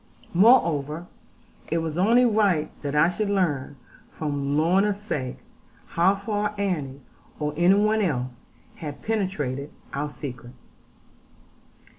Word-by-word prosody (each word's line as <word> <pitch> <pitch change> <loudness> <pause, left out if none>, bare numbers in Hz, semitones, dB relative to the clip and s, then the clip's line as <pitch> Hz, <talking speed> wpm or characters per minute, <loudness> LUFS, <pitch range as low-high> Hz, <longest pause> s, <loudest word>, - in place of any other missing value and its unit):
Moreover, 170 - +4 0.7
it 165 - +2
was 160 -2 -2
only 230 +8 +4
right 205 -9 +2
that 145 0 -3
I 150 +2 +5
should 200 +4 -1
learn, 150 -9 0 0.3
for 155 - -6
Lorna's 160 +9 +1
sake, 145 - -4 0.5
how 185 +4 +3
far 210 +1 -2
Annie, 150 -9 -2 0.4
or 150 -1 -1
any 175 +4 +5
one 215 +1 +2
else, 130 -9 -1 0.5
had 150 -3 -7
penetrated 150 - -2 0.2
our 145 +2 -2
secret. 125 -4 -8
170 Hz, 115 wpm, -25 LUFS, 145-200 Hz, 0.7 s, I